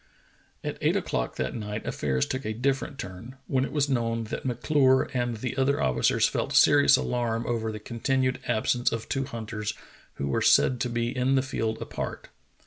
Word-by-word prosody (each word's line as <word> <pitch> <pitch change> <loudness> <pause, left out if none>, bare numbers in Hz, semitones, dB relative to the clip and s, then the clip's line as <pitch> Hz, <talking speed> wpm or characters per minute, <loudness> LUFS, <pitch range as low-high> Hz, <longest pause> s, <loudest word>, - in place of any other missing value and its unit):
At - - -4
eight - - +2
o'clock - - -2
that 65 0 -2
night 105 -1 -5
affairs 65 -3 0
took 130 +1 -4
a 110 - -2
different 135 +3 -1
turn, 105 +4 -8
when 130 0 +1
it - - -3
was 145 -1 +1
known 115 -3 0
that - - -4
M'Clure 130 +2 +2
and 120 -2 -1
the 125 +4 -4
other 135 +1 +2
officers 65 -1 +2
felt - - -2
serious 70 - +6
alarm 115 - -1
over 115 -2 -1
the 110 - -5
continued 130 +4 -1
absence 120 +3 +1
of 115 -1 -4
two 135 -1 -1
hunters 110 -4 -5 0.4
who 70 - -3
were 70 - 0
said 125 - +4
to 125 - 0
be 120 +2 -2
In 130 +1 +2
the 130 - +2
field 115 -4 -2
apart. - - -6
120 Hz, 185 wpm, -27 LUFS, 110-130 Hz, 0.4 s, serious